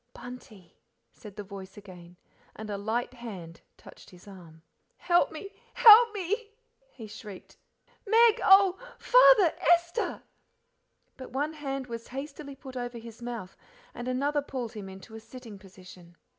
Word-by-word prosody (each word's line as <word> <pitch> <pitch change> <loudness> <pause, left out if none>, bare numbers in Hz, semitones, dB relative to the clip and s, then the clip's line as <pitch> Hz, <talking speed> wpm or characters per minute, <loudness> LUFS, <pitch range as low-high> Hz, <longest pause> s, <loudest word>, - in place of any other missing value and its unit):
"Bunty," 245 -7 -12 0.3
said 210 -3 -13
the 205 - -7
voice 195 0 -11
again, 180 -3 -13 0.4
and 215 -1 -8
a 200 - -3
light 230 +4 -3
hand 195 -9 -10 0.2
touched - - -16
his 180 +2 -17
arm. 170 -5 -14 0.3
"Help 350 0 +2
me 355 +6 -9 0.2
HELP 460 +1 +8
me!" 415 +2 -4 0.4
he 235 - -11
shrieked. 205 -2 -11 0.5
"Meg 460 +2 +4
oh! 385 -1 +6 0.2
Father - - +5
Esther!" 345 +6 +1 0.9
But 260 - -10
one 290 +4 -3
hand 275 -3 -5
was 230 -1 -8
hastily 280 +1 -8
put 265 -1 -12
over 245 -1 -5
his 230 0 -12
mouth 235 -6 -7 0.4
and 240 +1 -7
another 285 +3 0
pulled 255 -5 -6
him 200 -3 -8
into 190 +4 -13
a 220 - -8
sitting 225 -2 -12
position. 185 -3 -16
245 Hz, 145 wpm, -28 LUFS, 200-310 Hz, 0.9 s, HELP